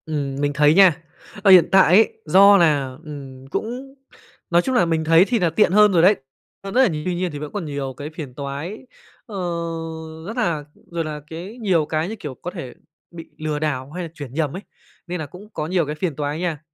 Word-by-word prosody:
Ừm, 145 -4 -3
mình 145 0 0
thấy 150 +1 +4
nha, 180 -4 +5 0.4
ở 200 - +6
hiện 180 -3 +8
tại 190 0 +7
ấy 225 - +4
do 200 +1 +7
là, 145 -7 +2
ừm, 135 -4 -10
cũng 250 - -5 0.6
nói 170 0 +4
chung 260 +6 -2
là 180 - +4
mình 165 -1 0
thấy 165 +3 +5
thì 240 -2 +1
nà 175 - +2
tiện 180 +4 +2
hơn 210 +1 +6
rồi 175 -3 +4
đấy, 190 +5 +6 0.5
hơn 195 - -6
rất 255 - +4
là 255 - +3 0.2
tuy 180 -1 -1
nhiên 180 0 -2
thì 145 - -6
vẫn 150 0 -6
còn 200 -5 -4
nhiều 140 -3 -4
cái 145 +1 -6
phiền 155 -5 -8
toái, 145 +9 -5 0.5
ờ, 215 - -10 0.9
rất 225 +4 -6
là 170 -10 0 0.3
rồi 170 -1 -2
là 150 -1 -5
cái 175 +9 -8
nhiều 180 -7 +2
cái, 155 +3 -2
như 220 - -5
kiểu, 150 -10 -7
có 175 - -7
thể 165 -10 -7 0.4
bị 165 -1 -10
lừa 155 -1 -3
đảo 140 -3 -3
hay 180 +2 -5
là 165 - -6
chuyển 145 -6 -9
nhầm 150 0 -1
ấy, 190 - -6 0.5
nên 180 0 -4
nà 155 - -4
cũng 180 +8 -13
có 155 - -3
nhiều 175 -1 +1
cái 150 +1 -4
phiền 155 -1 -2
toái 145 +1 -3
nha. 170 -4 -2
165 Hz, 230 wpm, -21 LUFS, 150-190 Hz, 0.9 s, hiện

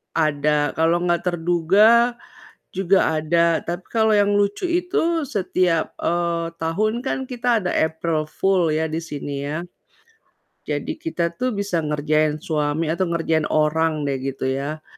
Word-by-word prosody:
Ada, 150 -2 +1
kalau 165 +2 +1
nggak 175 0 0
terduga, 185 +8 +3 0.5
juga 190 -3 +2
ada 165 +1 +1
tapi 175 +2 -3
kalau 220 -1 +2
yang 205 -1 +3
lucu 205 - 0
itu 340 -2 0
setiap, 185 - 0
eee, 170 -1 -1
tahun 215 +8 0
kan 265 0 -3
kita 245 -2 0
ada 185 -4 -2
April 160 -1 -1
Fool 185 -2 +1
ya 155 +1 0
di 160 +1 -3
sini 145 -3 -5
ya, 155 +5 -4 1.0
jadi - - -2
kita 240 - -2
tuh 255 -3 -1
bisa 200 -4 -1
ngerjain 155 0 0
suami 155 -2 -1
atau 185 +2 0
ngerjain 165 -2 0
orang 155 0 +1
deh 140 -2 -1
gitu 130 0 -3
ya, 145 +4 -4
170 Hz, 140 wpm, -22 LUFS, 155-200 Hz, 1.0 s, terduga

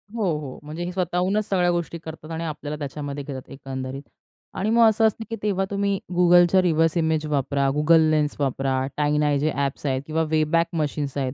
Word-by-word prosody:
हो, 225 - -1 0.2
हो, 140 -4 -8
म्हणजे 155 +3 -6
हे 175 - -3
स्वतःहूनच 185 +3 0
सगळ्या 180 -2 +2
गोष्टी 170 -1 -2
करतात 160 0 -9
आणि 165 +1 -3
आपल्याला 150 -2 -5
त्याच्यामध्ये 145 0 -5
घेतात 135 -2 -8
एकंदरीत. 135 0 -6 0.5
आणि 200 +3 -1
मग 230 0 +6
असं 220 +1 +2
असतं, 220 +1 -3
की 225 - -3
तेव्हा 195 -2 +1
तुम्ही 200 -1 0 0.2
Googleच्या 175 +1 +6
रिव्हर्स 165 -1 +2
इमेज 160 -2 +1
वापरा, 140 -1 0
Google 160 +1 +4
लेन्स 150 -1 +1
वापरा, 135 -1 0
टाईनाय 150 0 +2
जे 155 +2 +1
ॲप्स 140 +1 -2
आहेत 130 -2 0
किंवा 160 +1 0
वेबॅक 160 +2 +2
मशीन्स 145 -3 -2
आहेत. 130 -2 -1
155 Hz, 185 wpm, -24 LUFS, 145-175 Hz, 0.5 s, मग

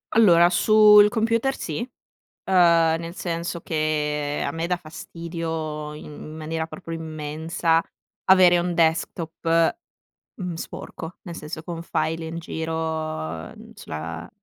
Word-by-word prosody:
Allora, 175 -6 +7
sul 210 +1 +7
computer 230 +4 +1
sì, 155 -3 -4 0.5
ehm, 170 -3 +3
nel 170 +1 -7
senso 170 0 -3
che 150 -2 -1
a 140 - -1
me 165 +1 -3
dà 180 - +1
fastidio 160 -2 -5
in 150 - -10
in 155 +1 -9
maniera 160 +1 -3
proprio 165 -1 -7
immensa, 160 +1 -1 0.4
avere 185 -2 +7
un 175 0 -1
desktop, 165 - +1 0.6
mhmm, 180 -3 -4
sporco. 165 +1 -8
Nel 170 -2 -7
senso, 155 +1 -7
con 165 0 -5
file 165 -1 -2
in 165 +1 -5
giro, 160 - -4
n - - -14
sulla 80 +2 -7
165 Hz, 125 wpm, -24 LUFS, 155-175 Hz, 0.6 s, Allora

